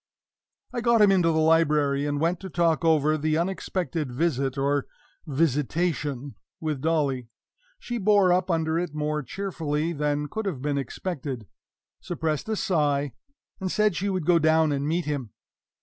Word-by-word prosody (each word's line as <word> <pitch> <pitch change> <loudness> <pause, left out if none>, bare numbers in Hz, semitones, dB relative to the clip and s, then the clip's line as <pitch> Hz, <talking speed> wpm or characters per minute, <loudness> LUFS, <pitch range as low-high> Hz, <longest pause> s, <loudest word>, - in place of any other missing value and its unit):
I 240 - -2
got 235 -1 +4
him 200 - +6
into 180 -3 +3
the 160 - 0
library, 150 -3 +3
and 145 0 -1
went 170 +3 +1
to 190 - -7
talk 170 -1 +1
over 155 -1 +3
this 155 +1 +1
unexpected 170 -4 -2
visit 135 -1 0
or 140 0 0 0.4
visitation 145 -1 -1 0.3
with 155 -4 -3
Dolly. 145 -6 0 0.5
She 240 - -4
bore 200 -3 +4
up 185 +1 +1
under 160 -1 +1
it 175 -4 -4
more 150 0 -1
cheerfully 165 -2 -2
than 150 -1 -1
could 220 +7 -4
have 165 -9 -3
been 140 +1 -1
expected 135 - -5 0.5
suppressed 160 +1 -3
a 220 - +1
sigh 145 - 0 0.5
and 190 -2 -2
said 210 -3 +2
she 200 +4 -1
would 185 -5 -2
go 175 0 +5
down 160 0 +3
and 140 0 -1
meet 170 +2 0
him. 140 -7 -3
155 Hz, 160 wpm, -26 LUFS, 145-175 Hz, 0.5 s, him